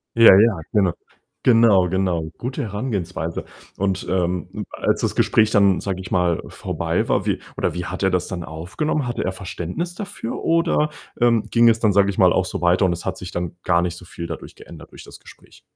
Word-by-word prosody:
Ja, 115 -4 +9
ja, 105 -3 +4
genau. 95 -5 +3 0.5
Genau, 115 -6 +5
genau. 90 -2 0
Gute 125 +2 -4
Herangehensweise 100 -7 -4 0.3
und, 95 -1 -1
ähm, 90 -1 -2
als - - 0
das - - -1
Gespräch 110 0 +3
dann, 100 -2 +4
sage 95 -2 -4
ich 95 - -10
mal, 90 -2 +1
vorbei - - -2
war, - - +1
wie - - 0 0.2
oder - - -1
wie 90 0 -4
hat 95 +3 -5
er 95 - +4
das 90 -1 0
dann 90 -2 -5
aufgenommen? 90 - -3
Hatte 120 - -2
er 95 - -1
Verständnis 95 - -5
dafür 200 - -6
oder, 165 -2 +2 0.3
ähm, 115 -2 +4
ging 115 0 +5
es 115 -1 +2
dann, 110 -3 +2
sage 100 0 +4
ich 95 - -4
mal, 90 -2 +5
auch 95 - +2
so - - -4
weiter 90 +2 +3
und 90 - +2
es 85 0 -5
hat 95 0 -3
sich 90 - -8
dann 85 -1 -4
gar 85 -1 +3
nicht 85 -1 -2
so 90 - -12
viel 85 -1 -7
dadurch - - -8
geändert - - -13
durch - - -12
das - - -13
Gespräch? - - -17
95 Hz, 210 wpm, -21 LUFS, 90-115 Hz, 0.5 s, Ja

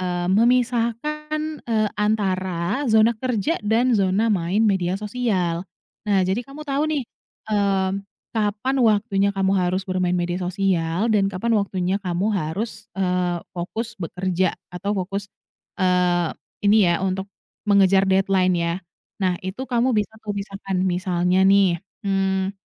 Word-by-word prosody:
eee, 175 -1 -2
memisahkan, 245 +7 +1 0.3
eee, 215 -2 +2
antara 200 +2 0
zona 220 +1 +5
kerja 250 - -1
dan 230 +4 +2
zona 205 +2 +2
main 190 +3 +1
media 190 -3 +1
sosial. 200 -6 -1 0.5
Nah, 195 -2 +3
jadi 190 +5 0
kamu 275 +4 -10
tahu 280 0 0
nih, 295 -3 0 0.5
mmm, 195 -1 +1 0.3
kapan 220 +4 0
waktunya 205 -3 +3
kamu 195 0 +2
harus 185 +1 0
bermain 185 -1 0
media 175 +1 -1
sosial 180 +2 0
dan 195 -2 +3
kapan 200 +5 -1
waktunya 195 -2 0
kamu 185 +3 -1
harus, 210 +5 -3
eee, 180 -2 0 0.2
fokus 220 +7 -4
bekerja 185 +1 -1 0.2
atau 200 +3 -2
fokus, 195 +2 -3 0.5
eee, 180 -2 +2 0.3
ini 205 -2 +5
ya 175 +2 +1
untuk 190 +1 -2 0.4
mengejar 195 -1 +5
deadline 190 -1 +3
ya. 170 0 0 0.5
Nah, 180 -2 +1
itu 190 +8 -4
kamu 245 +1 +2
bisa 210 0 0
tuh 205 - -2
pisahkan, 195 -1 -4
misalnya 180 0 +1
nih, 195 -3 +4 0.2
mmm 195 -1 0
195 Hz, 130 wpm, -22 LUFS, 185-220 Hz, 0.5 s, zona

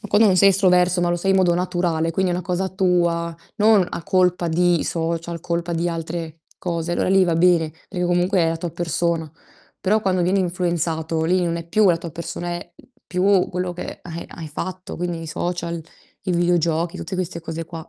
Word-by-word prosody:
Ma 210 - -8
quando 210 +3 +5
non 190 -3 +4
sei 195 +2 +7
estroverso 180 -2 +3
ma 175 0 +1
lo 175 - +1
sei 195 +3 0
in 190 - +4
modo 180 -2 +4
naturale, 175 -2 0
quindi 185 +2 0
è - - 0
una 180 - -2
cosa 185 +2 -1
tua, 175 -3 +1 0.2
non 210 -3 +5
a - - -5
colpa 180 -1 +2
di 175 0 +2
social, 165 0 -2
colpa 170 +1 -2
di 170 +1 0
altre 165 -1 -5 0.2
cose, 170 -1 -2
allora - - 0
lì 190 0 +5
va 170 -3 +2
bene, 165 -2 +4 0.2
perché 180 -2 -2
comunque 175 +2 +2
è 165 - +3
la 165 - -1
tua 170 0 -4
persona. 170 -1 -1 0.5
Però 210 +3 +2
quando 185 -3 +1
viene 190 +3 +2
influenzato, 170 -3 -1
lì 180 +2 +2
non 170 -1 -1
è 170 - -6
più 210 +2 +4
la 170 - +4
tua 170 -1 -7
persona, 170 +2 -5
è 175 0 -6 0.3
più 185 +1 +2
quello 180 0 -2
che 175 - -7
hai 170 -1 -7
hai 165 -2 -8
fatto, 185 +5 -6
quindi 175 -1 -3
i - - -7
social, 170 +1 -3 0.4
i 190 - -3
videogiochi, 170 -1 +1
tutte 190 - -6
queste 180 -2 -3
cose 165 0 -5
qua. 165 0 -9
175 Hz, 210 wpm, -22 LUFS, 165-185 Hz, 0.5 s, sei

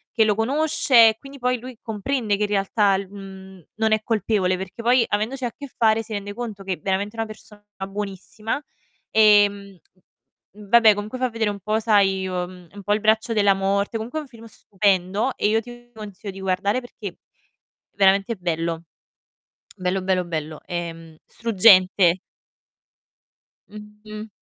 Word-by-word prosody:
che 225 - +4
lo 210 -1 +2
conosce 255 0 +4
e 220 - -4
quindi 275 +1 -12
poi 250 0 +1
lui 255 +1 -9
comprende 220 -1 -1
che 210 - -1
in 205 - -1
realtà 200 0 +2
lu 195 0 -5
mhmm, 190 -2 -11
non 220 0 +1
è 215 0 0
colpevole, 205 -5 0
perché 190 +5 -8
poi 245 +1 +4
avendoci 225 +6 -2
a 240 - -1
che 285 -1 -10
fare 225 0 +3
si 220 - -9
rende 205 0 -5
conto 220 -5 -6
che, 190 -2 -3
veramente 200 +3 -2
una 225 - -2
persona 210 -1 -12 0.3
buonissima, 205 +5 -5 0.5
ehm, 205 -2 +4 0.8
v 210 -1 -13
vabbè 225 -1 +7
comunque 210 +4 -5
fa 255 0 0
vedere 225 -2 -1
un 200 -1 -5
po' 215 +3 0
sai, 195 -4 +2
uhm, 180 -1 -5
un 200 -1 -10
po' 205 - +1
il 215 - +1
braccio 220 +2 +2
della 200 -2 +4
morte, 200 +2 -1
comunque 235 +8 -4
è - - -4
un 290 - -14
film 230 -2 -14
stupendo 200 +2 0
e - - 0
io 225 +1 +2
ti 240 +1 -13
consiglio 205 -2 -8
di 195 - -10
guardare 190 +4 0
perché 210 -6 -9 0.8
veramente 195 +3 +3
bello. 165 -2 -3 0.9
Bello, 185 +1 -1
bello, 185 -1 0
bello, 155 -2 -5
ehm, 165 -2 -6
struggente. 190 -5 +4 1.5
Mh-mh. 210 +1 -10
205 Hz, 160 wpm, -23 LUFS, 190-225 Hz, 1.5 s, vabbè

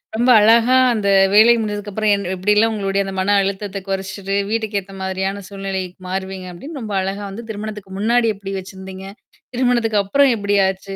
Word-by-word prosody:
ரொம்ப 240 +3 +2
அழகா 230 +4 +5 0.2
அந்த 205 -3 -1 0.2
வேலை 220 +3 +7
முடிஞ்சதுக்கு 205 -1 -4
அப்புறம் 215 +1 +1
என் 200 -2 -5
எப்பிடியெல்லாம் 210 +4 +2
உங்களுடைய 200 -1 -1
அந்த 195 - -5
மன 205 +2 +2
அழுத்தத்த 195 0 -3
குறச்சிட்டு, 195 0 -3
வீட்டுக்கு 220 -2 -1
ஏத்தமாரியான 190 +1 -4
சூழ்நிலை 195 -1 -4 0.2
மாறுவீங்க 190 0 -5
அப்பிடின்னு 275 - -9
ரொம்ப 210 -2 -5
அழகா 195 +2 -4
வந்து 225 +4 -9
திருமணத்துக்கு 210 -2 -7
முன்னாடி 230 +1 +2
எப்பிடி 195 0 -7
வச்சிருந்தீங்க. 190 0 -10 0.5
திருமணத்துக்கு 240 -4 +2
அப்புறம் 275 +6 +3
எப்படி 205 -1 0
ஆச்சு? 195 +1 -5
200 Hz, 160 wpm, -19 LUFS, 195-220 Hz, 0.5 s, வேலை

